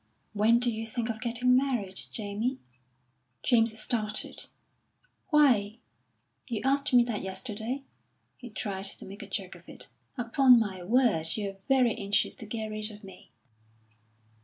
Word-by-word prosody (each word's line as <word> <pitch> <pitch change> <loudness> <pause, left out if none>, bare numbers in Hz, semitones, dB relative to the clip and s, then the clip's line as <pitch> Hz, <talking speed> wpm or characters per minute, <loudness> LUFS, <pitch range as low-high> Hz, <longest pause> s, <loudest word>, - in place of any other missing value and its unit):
"When 215 +3 +4
do 245 0 +1
you 225 0 -4
think 235 +1 -3
of 220 -1 -4
getting 250 +1 +2
married, 245 -8 0
Jamie?" 220 +5 -2 0.9
James 225 -2 +3
started. 215 -2 -3 0.8
"Why, 240 - +4 0.7
you 235 -5 -2
asked 280 +2 +2
me 245 -1 +7
that 235 -4 -3
yesterday," 220 +7 -4 0.5
He 245 - -10
tried 200 -3 -4
to 195 - -4
make 200 +3 -9
a - - -8
joke - - -4
of - - -15
it. - - -7 0.3
"Upon 250 +1 +6
my 195 -5 -2
word, 185 -6 +2
you're 200 -2 -3
very 255 -4 +4
anxious 200 0 0
to 220 - -7
get 220 0 -4
rid 215 0 -3
of 210 0 -12
me." 190 -2 -13
225 Hz, 145 wpm, -29 LUFS, 205-245 Hz, 0.9 s, me